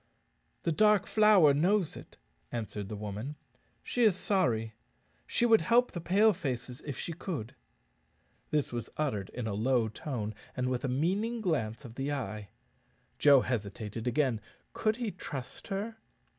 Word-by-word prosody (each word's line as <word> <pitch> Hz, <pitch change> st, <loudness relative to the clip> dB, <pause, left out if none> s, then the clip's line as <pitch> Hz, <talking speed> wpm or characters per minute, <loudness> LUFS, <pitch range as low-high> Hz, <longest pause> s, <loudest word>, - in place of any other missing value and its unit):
"The 170 Hz, -, +1 dB
Dark 210 Hz, +3 st, +4 dB
Flower 210 Hz, -9 st, +6 dB
knows 180 Hz, +4 st, +2 dB
it," -, -, -12 dB, 0.3 s
answered 105 Hz, -3 st, -4 dB
the 105 Hz, -, -4 dB
woman; 105 Hz, +7 st, -5 dB, 0.5 s
"she 245 Hz, -, -1 dB
is 215 Hz, -6 st, +5 dB
sorry. 125 Hz, -, +1 dB, 0.5 s
She 240 Hz, -, +2 dB
would 225 Hz, -2 st, +6 dB
help 245 Hz, +1 st, +3 dB
the 175 Hz, -, -5 dB
Pale 205 Hz, +6 st, +4 dB
faces 130 Hz, -7 st, -4 dB
if 140 Hz, -, -4 dB
she 170 Hz, -, -4 dB
could." 145 Hz, -, -5 dB, 1.0 s
This 150 Hz, -4 st, 0 dB
was 120 Hz, -2 st, -4 dB
uttered 115 Hz, -11 st, -1 dB
in 125 Hz, -2 st, -5 dB
a 110 Hz, -, -2 dB
low 115 Hz, +2 st, +2 dB
tone, 110 Hz, -2 st, -4 dB, 0.2 s
and 125 Hz, 0 st, 0 dB
with 125 Hz, +1 st, -1 dB
a -, -, 0 dB
meaning 195 Hz, -, 0 dB
glance 115 Hz, -, -1 dB
of 115 Hz, -, -9 dB
the 135 Hz, +3 st, -2 dB
eye. 105 Hz, -7 st, -4 dB, 0.7 s
Joe 140 Hz, -3 st, +7 dB
hesitated 110 Hz, -1 st, -3 dB
again 125 Hz, -3 st, +1 dB, 0.3 s
could 215 Hz, -1 st, +1 dB
he 235 Hz, -3 st, -3 dB
trust 140 Hz, -8 st, -7 dB
her? 210 Hz, +3 st, -3 dB
140 Hz, 155 wpm, -31 LUFS, -, 1.0 s, Joe